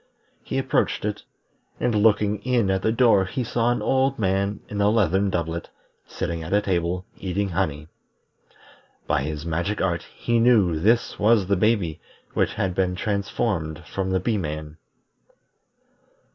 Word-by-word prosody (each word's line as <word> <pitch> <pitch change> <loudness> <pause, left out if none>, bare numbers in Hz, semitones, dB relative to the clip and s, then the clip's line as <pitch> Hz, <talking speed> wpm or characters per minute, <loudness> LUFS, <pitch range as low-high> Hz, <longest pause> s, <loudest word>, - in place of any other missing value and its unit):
He - - -3
approached - - 0
it, 105 -1 -3 0.6
and 120 - +1
looking 105 -1 +3
in 120 -4 +1
at 95 0 0
the 110 - +1
door 115 -5 +4
he 125 +7 -3
saw 120 +1 +1
an 120 - -1
old 135 +1 +2
man 100 0 0
in 105 0 -3
a 100 - +4
leathern 100 -2 +2
doublet, 85 -2 -3 0.4
sitting 85 -1 -4
at 80 +4 -5
a - - +5
table, 90 0 -1
eating 95 +2 -2
honey. 80 -5 -2 1.2
By - - +1
his 75 +2 -4
magic 85 +5 -1
art 85 -3 0
he 120 -1 0
knew 105 -9 +4
this 115 +7 +2
was 105 -2 +4
the 100 +2 +2
baby 95 -5 +1 0.3
which - - 0
had 95 -2 -1
been 90 0 0
transformed 100 -5 -2
from 95 -1 -3
the 95 0 +1
Bee 105 +3 0
man. 75 -2 -5
95 Hz, 155 wpm, -24 LUFS, 85-110 Hz, 1.2 s, a